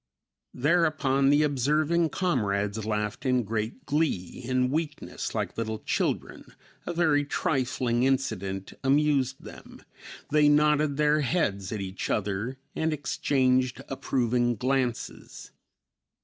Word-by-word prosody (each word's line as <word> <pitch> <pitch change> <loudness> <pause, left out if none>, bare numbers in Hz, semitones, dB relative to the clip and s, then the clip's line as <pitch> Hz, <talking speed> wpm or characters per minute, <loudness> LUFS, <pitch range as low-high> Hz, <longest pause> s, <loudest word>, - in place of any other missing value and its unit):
Thereupon 145 -2 +2
the 145 +2 +4
observing 150 +4 +1
comrades 105 - -1
laughed 105 -1 -2
in 125 -2 +2
great 110 +3 -4
glee; 140 - -1
in 130 +1 +1
weakness, 155 0 -3
like - - -2
little 110 -1 -2
children, 110 - -3 0.3
a 175 - -2
very 155 -4 +3
trifling 130 -4 0
incident 100 -8 -1
amused 135 -1 +2
them; - - -12 0.5
they 150 0 +5
nodded 150 -1 +3
their 150 0 +3
heads 105 - -1
at 105 -3 -3
each 95 0 -5
other 105 +5 -2 0.2
and 160 0 0
exchanged 130 -3 +1
approving 125 -2 0
glances. 130 -1 -3
130 Hz, 110 wpm, -27 LUFS, 115-150 Hz, 0.5 s, they